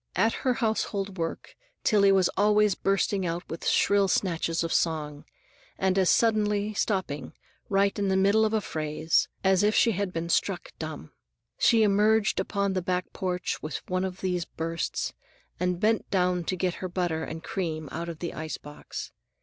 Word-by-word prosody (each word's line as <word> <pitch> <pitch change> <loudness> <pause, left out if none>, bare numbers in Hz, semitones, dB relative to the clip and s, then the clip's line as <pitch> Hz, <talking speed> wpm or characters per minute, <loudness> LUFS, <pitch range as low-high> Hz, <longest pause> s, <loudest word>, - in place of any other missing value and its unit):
At 225 +5 +3
her 255 -2 +1
household 200 -4 -1
work 165 0 -4 0.3
Tillie 200 -3 +5
was 190 -2 +4
always 210 0 +4
bursting 195 0 0
out 170 0 -3
with 165 - -5
shrill 200 -1 +3
snatches 165 -3 0
of 165 - -2
song, 150 -3 -1 0.5
and 190 -1 +1
as 190 -2 +3
suddenly 210 -2 +2
stopping, 185 -9 -2 0.4
right 200 0 +3
in 200 - +1
the 190 0 +2
middle 200 +3 +4
of 215 - +2
a 220 -1 +1
phrase, 155 -1 0 0.2
as 190 -1 +4
if 210 +1 +2
she 230 - +5
had 200 -2 -2
been 165 -1 -3
struck 185 +1 0
dumb. 155 - -6 0.5
She 225 -2 +5
emerged 210 +1 +3
upon 200 -1 -1
the 185 - 0
back 180 +1 -2
porch 180 -1 -2
with 155 - -6
one 185 0 0
of 190 -1 -4
these 180 -2 0
bursts, 165 0 -3 0.5
and 180 0 0
bent 220 +2 +1
down 180 -2 +1
to 185 - -1
get 180 0 0
her 185 - -3
butter 175 -3 -1
and 160 +1 -6
cream 160 -5 -3
out 170 0 -4
of 165 - -6
the 170 +1 -5
ice 155 0 -5
box. 145 0 -8
185 Hz, 175 wpm, -27 LUFS, 165-200 Hz, 0.5 s, Tillie